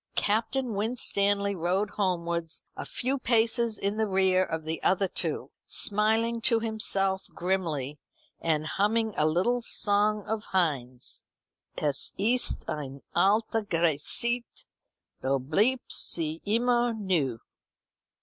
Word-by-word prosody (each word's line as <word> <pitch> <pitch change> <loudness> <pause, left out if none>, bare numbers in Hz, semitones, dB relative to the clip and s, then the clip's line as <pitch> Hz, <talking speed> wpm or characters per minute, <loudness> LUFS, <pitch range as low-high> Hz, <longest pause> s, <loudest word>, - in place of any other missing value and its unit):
Captain 235 +4 0
Winstanley 200 -2 +1
rode 185 +3 -1
homewards 170 -4 -2
a - - -6
few 265 +2 -2
paces 230 -2 +1
in 200 +2 -2
the 220 -1 +1
rear 190 -1 +3
of 160 -3 -4
the 160 +1 -4
other 190 +1 +2
two, - - -3 0.2
smiling 220 +3 +2
to 230 -1 +3
himself 195 -4 +1
grimly, 160 -7 -2 0.4
and 155 -2 0
humming 220 +5 0
a 155 - +2
little 190 +10 +1
song 210 -1 0
of 215 +1 -3
Heine's: 135 -9 -1 0.6
"Es 145 -3 0
ist 235 +5 +2
eine 140 -2 -5
alte 215 +5 +2
Geschichte, 175 - 0 0.6
Doch 135 +1 +1
bleibt 215 - +1
sie 160 -1 -1
immer 240 +2 +2
neu." 170 - 0
200 Hz, 115 wpm, -28 LUFS, 165-225 Hz, 0.6 s, rear